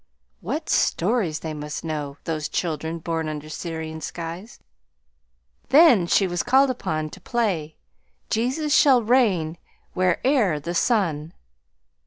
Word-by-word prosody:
What - - -4
stories 180 -4 +1
they 160 -1 -4
must 150 0 -6
know, 150 -3 -4
those 155 -2 -3
children 160 -1 -2
born 165 -1 -3
under 155 0 -6
Syrian 160 -1 -6
skies! 170 +8 -7 1.1
Then 275 - +6
she 195 - +3
was 175 -1 -1
called 265 +2 +4
upon 155 -10 -3
to - - -12
play 185 -10 -1 0.6
"Jesus 265 +6 0
shall 270 -8 +5
reign 195 -10 +2 0.3
where'er 185 - +2
the 170 +4 -5
sun." 170 -7 0
170 Hz, 120 wpm, -23 LUFS, 155-235 Hz, 1.1 s, Then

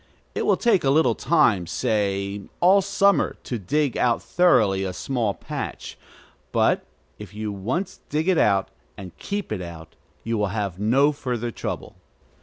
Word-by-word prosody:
It - - -2
will - - +4
take 235 -6 +2
a 135 - +2
little 135 -4 +4
time, 120 - +2
say 100 -2 -1 0.2
all 190 +3 +5
summer, 200 +1 +2
to 120 - -4
dig 140 +7 0
out 120 -2 +2
thoroughly 105 - +3
a 95 -1 -3
small 115 -2 -2
patch; - - -6 0.6
but - - +2 0.4
if 105 -1 -10
you 105 0 -3
once 120 - -3
dig 155 +3 -1
it 185 -4 +3
out, 100 -2 +2 0.3
and 90 -4 -9
keep 205 - -4
it 105 -4 -2
out, 85 -2 -9 0.3
you 115 -1 -1
will 105 - +1
have 100 -2 -3
no 130 +8 +3
further 125 -5 -3
trouble. - - -6
115 Hz, 160 wpm, -24 LUFS, 100-150 Hz, 0.6 s, all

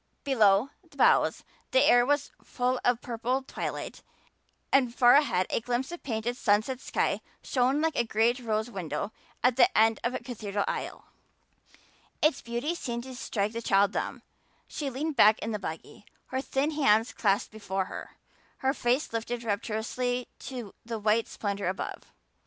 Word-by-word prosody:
Below 225 -3 +4
the - - -21
boughs - - +4 0.3
the - - +4
air 245 0 +5
was 290 0 +1
full 250 0 -1
of 245 - +4
a 235 - -23
purple 245 +2 -2
twilight - - -5 0.7
and 250 -3 +3
far 245 -1 +6
ahead 275 -11 +3
a - - +1
glimpse 245 +5 -2
of 345 - -7
painted 235 -1 -2
sunset 215 +4 +1
sky - - -1 0.2
shone 260 +3 +1
like 320 -1 +1
a - - +2
great 230 +2 +1
rose 220 -2 -1
window 180 0 -4 0.3
at 250 -1 +3
the 365 +8 +4
end 225 0 +4
of 240 +2 -1
a - - -2
cathedral 210 -4 -3
aisle. - - -4 1.1
Its 305 -2 +2
beauty 240 +7 -2
seemed 240 -8 -4
to 260 0 -8
strike 210 -4 -2
the 230 +1 -4
child 200 -2 +3
dumb. - - -4 0.4
She 290 -2 -4
leaned 290 +4 -3
back 215 +1 +7
in 225 - -4
the 210 - -2
buggy, 165 +3 -8 0.2
her 260 0 -1
thin 275 +3 0
hands 225 -7 +3
clasped 205 +1 +1
before 195 -3 -3
her, - - -9 0.4
her 265 0 +1
face 250 0 0
lifted 235 +1 -3
rapturously 230 +4 -2
to 245 -6 -7
the 230 0 -4
white 215 +1 +2
splendor 200 -2 -3
above. 185 +1 -4
235 Hz, 165 wpm, -28 LUFS, 215-260 Hz, 1.1 s, back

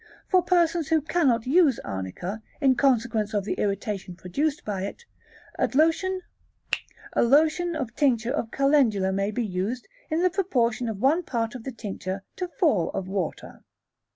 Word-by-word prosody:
For 370 - +5
persons 340 -3 +2
who 320 -1 +3
cannot 280 -7 +1
use 285 -2 +4
Arnica, 100 - -5 0.2
in 270 -3 +4
consequence 230 -5 +1
of 205 - +1
the - - -1
irritation 200 -2 -2
produced 275 - -2
by 200 -3 -2
it, 200 - -6 0.5
a - - +3 1.5
lotion 315 +7 +3
of 255 -6 -4
tincture 245 -3 +2
of 235 -6 -2
Calendula 255 -9 +3
may 195 +1 0
be 230 +2 -2
used 200 +6 -3 0.2
in 325 +2 +1
the 365 - +3
proportion 250 - 0
of 215 - -4
one 285 - +3
part 230 -8 -2
of 250 -3 -8
the 265 - -3
tincture 195 -4 -5
to 365 - -2
four 300 - +1
of 185 - -3
water. 190 -3 -4
240 Hz, 155 wpm, -26 LUFS, 205-305 Hz, 1.5 s, For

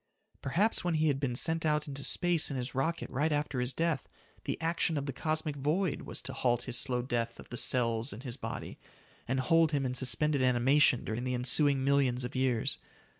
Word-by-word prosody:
Perhaps 195 +11 +1
when 175 -2 0
he 155 0 +2
had 135 -2 0
been 130 -4 -2
sent 160 +5 0
out 150 -1 0
into 140 -1 -4
space 175 -3 +2
in 140 - -4
his 125 0 -3
rocket 160 +6 -1
right 150 +5 0
after 145 -3 -1
his 125 +1 0
death, 165 0 -1 0.4
the - - -3
action 165 0 0
of 140 - -2
the 140 - -4
cosmic 155 +2 -2
void 150 +4 -1
was - - -6
to - - -6
halt 120 -1 0
his 125 -1 -1
slow 125 -2 0
death 120 -2 -3
of - - -12
the - - -6
cells 115 0 +1
in 110 - -8
his 125 -3 -6
body, - - -7 0.5
and 130 +1 0
hold 165 +3 +3
him 140 -2 0
in 125 - -2
suspended 130 +3 +1
animation 130 +2 +3
during 110 +3 -3
the 125 0 -1
ensuing 135 +2 +4
millions 135 -3 +2
of 125 +3 -6
years. 130 -3 0
135 Hz, 210 wpm, -31 LUFS, 125-155 Hz, 0.5 s, ensuing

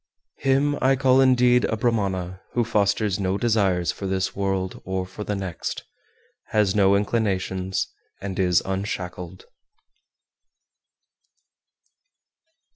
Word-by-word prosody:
410. 135 +2 +2
Him - - -4
I 135 +1 +4
call 130 0 +4
indeed 125 -1 +4
a 110 - -1
Brahmana 95 -6 -1
who 120 - +2
fosters 105 -2 +1
no 95 0 0
desires 100 -7 +1
for 100 - -6
this 95 -1 -1
world 95 -1 -2
or 95 0 -2
for 95 +3 -8
the 105 - -2
next, 95 -4 -4 0.6
has 105 -3 +2
no 100 -2 +4
inclinations, 95 -3 -1 0.3
and 95 -1 -5
is 90 -2 +3
unshackled. 95 -2 -5
100 Hz, 115 wpm, -24 LUFS, 95-115 Hz, 0.6 s, I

